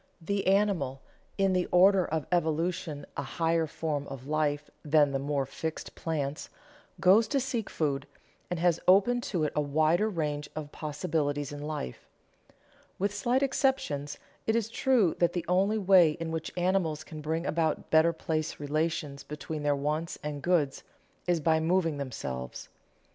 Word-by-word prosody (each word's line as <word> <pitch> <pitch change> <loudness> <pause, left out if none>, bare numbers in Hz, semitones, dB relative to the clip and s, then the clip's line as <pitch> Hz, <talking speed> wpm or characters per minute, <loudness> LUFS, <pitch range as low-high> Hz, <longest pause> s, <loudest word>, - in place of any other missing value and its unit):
The 195 +4 -2
animal, 190 -10 +1 0.3
in 195 -1 +3
the 180 -1 +1
order 185 +1 +5
of 155 -2 -2
evolution 165 -2 -1
a - - -2
higher 165 +3 0
form 150 -2 -3
of 135 -2 -8
life 150 0 0 0.2
than 150 -1 +4
the 135 - -1
more 140 0 -1
fixed 160 +4 -5
plants, 150 -3 -3 0.5
goes 205 +5 +5
to 275 - +1
seek 245 -5 -2
food, 140 -3 -1 0.4
and 180 - -2
has 170 -1 +3
open 205 +7 +5
to 175 -6 0
it 150 - -1
a 150 - +2
wider 155 +8 +2
range 150 -6 -2
of 150 -1 -5
possibilities 150 -2 -2
in 145 0 -7
life. 150 - -5 0.9
With 200 +2 0
slight 240 +6 +1
exceptions, 265 - 0 0.3
it 220 - +2
is 225 -1 0
true 230 -7 +2
that 175 -1 +3
the 175 -2 -2
only 195 +5 +2
way 185 -6 +6
in 165 0 -5
which 160 -1 -3
animals 175 -4 +1
can 155 -1 -9
bring 160 +3 -2
about 160 -1 -1
better 160 +1 +5
place 160 -1 -3
relations 150 -1 -2
between 150 +1 -6
their 145 -1 +2
wants 150 +4 -2
and 150 -1 -4
goods 160 -6 +1 0.5
is 175 -2 +2
by 160 +1 +3
moving 165 -2 +1
themselves. 65 - -5
160 Hz, 160 wpm, -29 LUFS, 145-180 Hz, 0.9 s, way